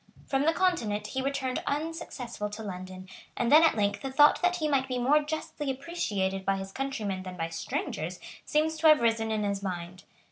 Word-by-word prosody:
From 275 +2 0
the - - +6
Continent 235 - 0
he 265 +5 -3
returned 265 -1 -1
unsuccessful 285 -8 -3
to 210 +2 -7
London; 185 -1 -7 0.3
and 240 -1 +1
then 305 +2 +9
at 325 - +4
length 205 -1 0
the 270 - -4
thought 295 +2 +6
that 360 0 +3
he 315 -3 -1
might 270 -2 +1
be 255 -1 -2
more 275 +5 +4
justly 300 -1 -4
appreciated 210 - -2
by 195 0 +1
his 195 0 -6
countrymen 215 -7 -3
than 185 -1 -8
by 165 -1 -2
strangers 165 +1 -4 0.2
seems 315 +1 +1
to 320 - +3
have 305 -4 +7
risen 225 -1 +1
in 215 -1 0
his 200 -1 -1
mind. 180 -1 -5
240 Hz, 200 wpm, -29 LUFS, 195-295 Hz, 0.3 s, then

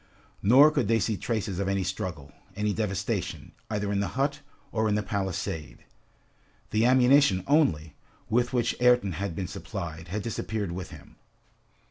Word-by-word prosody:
Nor 135 +9 +7
could 130 - 0
they 115 +1 +3
see 110 +1 0
traces 105 -3 -3
of 100 - -1
any 100 -1 0
struggle, 90 -6 -5 0.2
any 105 +1 0
devastation, 100 -3 -3 0.2
either 105 -2 -2
in 100 - 0
the 100 - 0
hut, 140 +2 0 0.3
or 110 -1 +1
in 105 - +2
the 105 - 0
palisade. 95 -6 -4 0.9
The 110 +2 +3
ammunition 130 -6 +5
only, 85 - +2 0.3
with 120 +2 +1
which 125 -2 0
Ayrton 125 -5 +4
had 95 +1 -4
been 95 0 -3
supplied, 80 0 -6
had 100 +4 -4
disappeared 110 -3 -3
with 90 0 -6
him. 80 -5 -14
105 Hz, 155 wpm, -27 LUFS, 95-120 Hz, 0.9 s, Nor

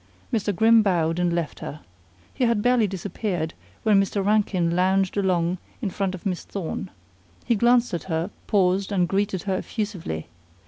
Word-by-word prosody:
Mr. 210 -2 +1
Grimm 225 +4 +6
bowed 170 -4 +1
and 175 -1 +2
left 170 -3 -2
her. 150 - -7 0.5
He 255 - +1
had 230 -3 +1
barely 245 -3 +4
disappeared 185 -3 -3 0.3
when 210 -3 +5
Mr. 195 0 -1
Rankin 195 -5 +2
lounged 190 +1 +2
along 180 -3 +1 0.2
in 205 -7 -2
front 190 0 -1
of 180 - -12
Miss 185 -3 -2
Thorne. 190 0 -5 0.6
He - - +3
glanced 240 +1 +3
at 170 - -3
her, 165 +2 -2 0.2
paused 195 0 +2
and 180 -3 +2
greeted 195 -1 0
her 195 -2 0
effusively. 185 - -4
195 Hz, 165 wpm, -24 LUFS, 175-210 Hz, 0.6 s, Grimm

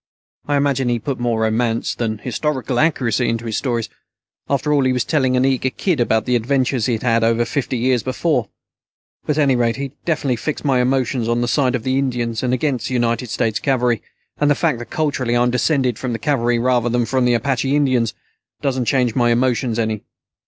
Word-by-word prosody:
I 145 -1 +2
imagine 135 -3 +1
he 120 - +1
put 125 +3 -4
more 120 -2 0
romance 115 +1 0
than 110 -2 -2
historical 130 +2 -2
accuracy 125 -7 +1
into 115 0 -2
his 110 -2 -2
stories. 120 -4 -1 0.6
After 140 +2 +1
all, 140 -2 +3
he 130 - +2
was 125 -3 0
telling 130 -4 +1
an 125 - +3
eager 130 -1 +1
kid 165 +3 -1
about 110 -2 +1
the 125 - +1
adventures 130 0 +1
he'd 115 -3 -1
had 115 -2 +2
over 115 +1 +2
fifty 130 +1 -2
years 125 0 +1
before. 130 0 -1 0.8
But 150 - 0
at 150 - +4
any 135 -2 +3
rate, 120 -1 +1
he 135 0 -5
definitely 145 -7 0
fixed 150 +5 -4
my 130 -3 +3
emotions 125 -2 0
on 120 0 +1
the 120 - 0
side 130 -1 +1
of 120 - -3
the 130 +1 +1
Indians 120 -4 -1
and 125 - 0
against 130 -2 -1
the 130 - -3
United 120 0 0
States 110 -1 -1
Cavalry. 125 -4 +1 0.4
And 145 - +3
the 145 - +4
fact 155 -5 0
that 120 - -8
culturally 135 -6 0
I'm 120 0 +2
descended 125 -1 +1
from 125 -2 -3
the - - -2
Cavalry 120 -4 +1
rather 120 0 +1
than 120 0 +1
from 130 +2 +1
the 120 -1 +3
Apache 135 +3 0
Indians 130 -6 +1 0.4
doesn't 130 -3 -1
change 125 -2 +1
my 120 -1 +2
emotions 120 -1 +1
any." 110 -2 -1
125 Hz, 210 wpm, -19 LUFS, 115-135 Hz, 0.8 s, at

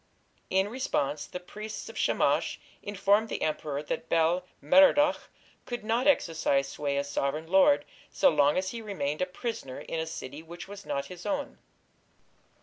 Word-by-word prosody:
In 190 +1 +2
response, 155 - -2
the 180 - -6
priests 210 +4 -7
of - - -9
Shamash - - +1 0.2
informed 205 +2 +2
the - - -3
emperor 150 -2 -2
that 160 +2 -4
Bel 170 +2 +2
Merodach 290 +1 +5 0.4
could 240 -2 -4
not 230 +5 +1
exercise 160 - +2
sway 140 0 -2
as 140 0 -1
sovereign 145 +2 -1
lord 190 - +4 0.2
so 280 - +4
long 145 +2 +3
as 185 0 0
he 235 - -6
remained 170 -9 -3
a 185 - +1
prisoner 180 - -5
in 165 - -4
a 160 - -2
city 145 -2 -7
which 170 +3 -10
was 200 0 -10
not 140 - -2
his 180 -1 -10
own. 285 -1 -3
180 Hz, 160 wpm, -29 LUFS, 150-220 Hz, 0.4 s, Merodach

